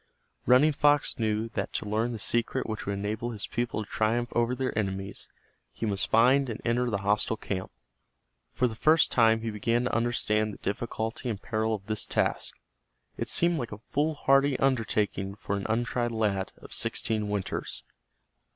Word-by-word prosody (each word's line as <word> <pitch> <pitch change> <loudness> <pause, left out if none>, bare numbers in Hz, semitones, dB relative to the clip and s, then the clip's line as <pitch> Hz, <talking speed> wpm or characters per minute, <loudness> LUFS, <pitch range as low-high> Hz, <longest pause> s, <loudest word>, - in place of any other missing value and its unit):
Running 130 +5 +6
Fox 145 -2 +2
knew 110 0 0
that - - -4
to - - -2
learn 110 +3 0
the 115 - -4
secret 120 +5 0
which 110 -2 -5
would 100 - 0
enable 105 +4 -3
his 110 -4 -3
people 120 -2 -2
to - - -14
triumph 115 +2 0
over 120 +1 +1
their 130 0 -2
enemies 95 -2 -3 0.4
he - - -4
must 100 -2 -1
find 130 +4 +4
and 115 - -4
enter 120 +1 +1
the 100 -3 -2
hostile 105 +2 +1
camp. 95 -2 -4 0.8
For 125 - +1
the 115 - -5
first 155 +8 +4
time 115 -2 +4
he 115 0 -3
began 115 +3 0
to 125 - -1
understand 110 -3 +1
the - - -13
difficulty 115 +4 -3
and 105 -4 -3
peril 110 -1 -1
of 100 -1 -11
his 110 -1 -1
task. - - -1 0.6
It - - -2
seemed 170 -1 +3
like 120 - -4
a 105 - -6
foolhardy 140 +1 +2
undertaking 105 -6 0
for 100 - -3
an 100 - -3
untried 120 +1 0
lad 105 -4 0
of - - -10
sixteen 105 -2 0
winters. 105 -2 -3
115 Hz, 175 wpm, -28 LUFS, 105-125 Hz, 0.8 s, Running